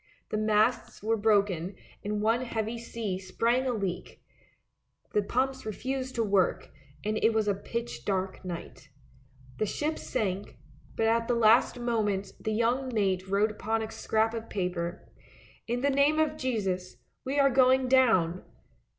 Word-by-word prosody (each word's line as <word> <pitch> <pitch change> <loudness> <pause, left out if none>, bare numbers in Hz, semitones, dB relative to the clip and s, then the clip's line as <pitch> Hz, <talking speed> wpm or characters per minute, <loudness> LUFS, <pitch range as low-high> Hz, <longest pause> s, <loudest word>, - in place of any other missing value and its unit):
The 215 - -1
masts 215 +1 +1
were 225 +1 +2
broken 200 -4 +1 0.3
and 210 0 -2
one 225 +3 +2
heavy 230 -1 -3
sea 225 -5 -4
sprang 235 +7 0
a - - +2
leak; 195 -6 -4 0.9
the 210 - +3
pumps 260 +5 -1
refused 260 +4 -4
to 230 - +1
work; 200 -3 +1 0.3
and 215 +1 0
it 225 - +4
was 215 -1 +1
a 205 - +3
pitch 235 +4 -5
dark 190 -1 -2
night. 170 -5 -7 0.7
The 215 - +1
ship 305 +8 -2
sank, 200 -5 -3 0.4
but 225 - +1
at 230 +1 +2
the 245 - +2
last 230 +2 +4
moment 210 -5 -1
the 220 - -2
young 240 +4 +1
mate 195 -4 0
wrote 200 +3 +2
upon 220 +1 -2
a 220 - -6
scrap 220 +1 0
of 225 -1 -6
paper, 180 -2 -3 0.3
" - - -26
In 240 +1 -1
the 280 +1 +2
name 280 +3 +3
of 310 -1 +2
Jesus, 200 -10 -2 0.3
we 270 +2 -2
are 275 -1 +5
going 260 0 +4
down! 220 -10 +3
220 Hz, 160 wpm, -29 LUFS, 200-245 Hz, 0.9 s, are